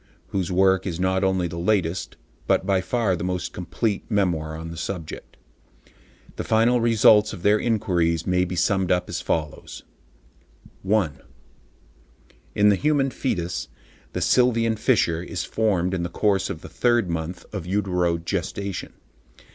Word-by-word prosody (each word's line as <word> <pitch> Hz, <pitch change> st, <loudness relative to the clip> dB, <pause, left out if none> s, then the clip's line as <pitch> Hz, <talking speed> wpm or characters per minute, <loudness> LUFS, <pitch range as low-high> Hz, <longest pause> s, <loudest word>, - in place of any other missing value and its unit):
whose 95 Hz, -2 st, -2 dB
work 95 Hz, +1 st, +3 dB
is 85 Hz, -2 st, -4 dB
not 95 Hz, +1 st, +1 dB
only 95 Hz, -2 st, +1 dB
the 85 Hz, 0 st, -6 dB
latest, 90 Hz, -2 st, 0 dB, 0.3 s
but -, -, +2 dB
by 95 Hz, -1 st, +2 dB
far 110 Hz, -2 st, 0 dB
the 85 Hz, -, -5 dB
most 90 Hz, 0 st, -3 dB
complete, 100 Hz, +4 st, -2 dB
memoir 85 Hz, -7 st, 0 dB
on 80 Hz, +1 st, -7 dB
the -, -, -7 dB
subject. 85 Hz, -1 st, -6 dB, 1.0 s
The -, -, -2 dB
final 115 Hz, +2 st, +3 dB
results 110 Hz, -2 st, +5 dB
of 90 Hz, -5 st, -9 dB
their 105 Hz, +1 st, +4 dB
inquiries 90 Hz, -8 st, 0 dB
may 90 Hz, 0 st, +2 dB
be 90 Hz, 0 st, -4 dB
summed 95 Hz, +1 st, +1 dB
up 90 Hz, 0 st, +1 dB
as -, -, -3 dB
follows:— 75 Hz, -2 st, -3 dB, 1.0 s
1. 95 Hz, -8 st, 0 dB, 1.4 s
In 105 Hz, 0 st, +5 dB
the 100 Hz, -, +5 dB
human 140 Hz, +2 st, +1 dB
foetus, 90 Hz, -10 st, -2 dB, 0.5 s
the -, -, -3 dB
sylvian 115 Hz, -3 st, +3 dB
fissure 110 Hz, -8 st, +1 dB
is 90 Hz, -1 st, -4 dB
formed 95 Hz, -5 st, 0 dB
in 90 Hz, -, -1 dB
the 85 Hz, -, -3 dB
course 100 Hz, +2 st, +1 dB
of 80 Hz, -, -5 dB
the -, -, -9 dB
third 120 Hz, -4 st, +1 dB
month 85 Hz, +1 st, -4 dB
of 95 Hz, -5 st, -5 dB
uterogestation. 90 Hz, 0 st, -2 dB
95 Hz, 145 wpm, -24 LUFS, 85-105 Hz, 1.4 s, results